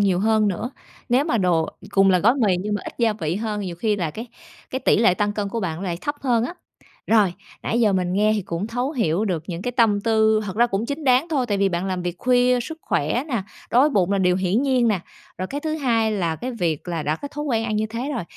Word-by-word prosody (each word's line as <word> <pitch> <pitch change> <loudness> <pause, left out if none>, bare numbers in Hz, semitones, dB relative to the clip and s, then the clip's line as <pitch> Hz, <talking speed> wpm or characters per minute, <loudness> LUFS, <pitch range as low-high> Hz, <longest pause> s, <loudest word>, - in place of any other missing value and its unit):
nhiều 190 -3 +2
hơn 215 -1 +3
nữa. 220 +7 -3 0.4
Nếu 255 +3 +3
mà 270 -8 0
đồ 175 -4 +2 0.2
cùng 195 0 +4
là 185 - +4
gói 230 +8 +4
mì 215 -9 +2
nhưng 210 +2 -2
mà 205 - -2
ít - - -6
gia 230 -2 +3
vị 170 -5 -3
hơn 210 -1 -3
nhiều 180 -4 -5
khi 210 +3 0
là 170 -5 -2
cái 225 +10 -7 0.4
cái 260 - -2
tỉ - - +3
lệ 185 -5 +4
tăng 205 +1 0
cân 205 -1 -2
của 230 - -3
bạn 165 -5 -2
nó 180 - -7
lại 175 -3 -3
thấp 290 - -2
hơn 240 -4 +1
á. 340 - -5 0.6
Rồi, 210 -5 +4 0.3
nãy 235 - 0
giờ 215 -4 +4
mình 180 -1 0
nghe 210 +2 +3
thì 205 - -1
cũng 170 +2 -4
thấu 245 +4 -2
hiểu 210 - 0
được 175 -6 -1
những 175 0 -5
cái 245 - -2
tâm 225 -4 +3
tư, 220 0 +3
thật 195 0 -6
ra 240 - +5
cũng 215 0 -2
chính 285 +2 -4
đáng 260 +5 +3
thôi 275 -6 0
tại 205 -3 -1
vì 195 0 +3
bạn 175 +1 -2
làm 185 -2 -2
việc 175 -1 -3
khuya, 250 0 +3
sức 320 +6 -7
khỏe 155 - 0
nè, 235 -8 -1 0.3
đói 245 - +5
với 295 +3 +4
bụng 195 -4 +2
là 200 - +2
điều 180 -1 +3
hiển 190 +7 +1
nhiên 255 -4 +2
nè. 205 -5 +1 0.4
Rồi 185 - -2
cái 285 +8 -5
thứ 310 0 -2
hai 230 -7 +1
là 170 -5 -1
cái 250 +10 -4
việc 175 - -2
là 170 -3 -2
đã 150 +1 -1
có 285 - -7
thói 295 +1 -5
quen 230 -6 0
ăn 215 -2 -1
như 215 - 0
thế 235 +6 -4
rồi, 235 - -2
215 Hz, 280 wpm, -22 LUFS, 185-245 Hz, 0.6 s, ra